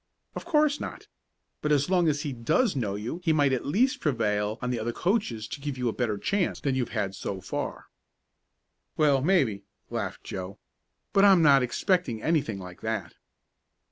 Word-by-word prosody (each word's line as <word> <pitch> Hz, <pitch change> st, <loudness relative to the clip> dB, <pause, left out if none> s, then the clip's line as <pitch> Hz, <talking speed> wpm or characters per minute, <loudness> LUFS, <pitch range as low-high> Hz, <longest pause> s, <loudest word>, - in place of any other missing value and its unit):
"Of -, -, -6 dB
course 305 Hz, -3 st, +2 dB
not. -, -, -7 dB, 0.6 s
But 150 Hz, -, 0 dB
as 145 Hz, -1 st, +3 dB
long 180 Hz, -2 st, +3 dB
as 145 Hz, -1 st, +1 dB
he 145 Hz, -, -3 dB
does 150 Hz, -, +1 dB
know 105 Hz, -7 st, -1 dB
you 115 Hz, -, -5 dB
he 165 Hz, -, +3 dB
might 145 Hz, -3 st, +3 dB
at 130 Hz, -, -2 dB
least 240 Hz, -, +2 dB
prevail 110 Hz, -6 st, 0 dB
on 125 Hz, 0 st, -2 dB
the 120 Hz, -, -1 dB
other 120 Hz, +2 st, -2 dB
coaches 150 Hz, -, -1 dB
to 140 Hz, -, -6 dB
give 145 Hz, -2 st, -4 dB
you 125 Hz, -1 st, -1 dB
a -, -, -3 dB
better 110 Hz, -5 st, -1 dB
chance 195 Hz, -, 0 dB
than 140 Hz, -, 0 dB
you've 130 Hz, -3 st, -1 dB
had 105 Hz, -4 st, -2 dB
so 95 Hz, 0 st, -5 dB
far." 95 Hz, -, -5 dB, 1.1 s
"Well, 145 Hz, -3 st, +4 dB
maybe," 135 Hz, -, +2 dB, 0.3 s
laughed -, -, -4 dB
Joe. 95 Hz, +1 st, -6 dB, 0.6 s
"But 195 Hz, -, +5 dB
I'm 190 Hz, -4 st, +7 dB
not 140 Hz, -3 st, +6 dB
expecting 130 Hz, -, 0 dB
anything 140 Hz, -6 st, 0 dB
like 90 Hz, -2 st, -10 dB
that." 110 Hz, -2 st, -3 dB
135 Hz, 180 wpm, -27 LUFS, 110-170 Hz, 1.1 s, I'm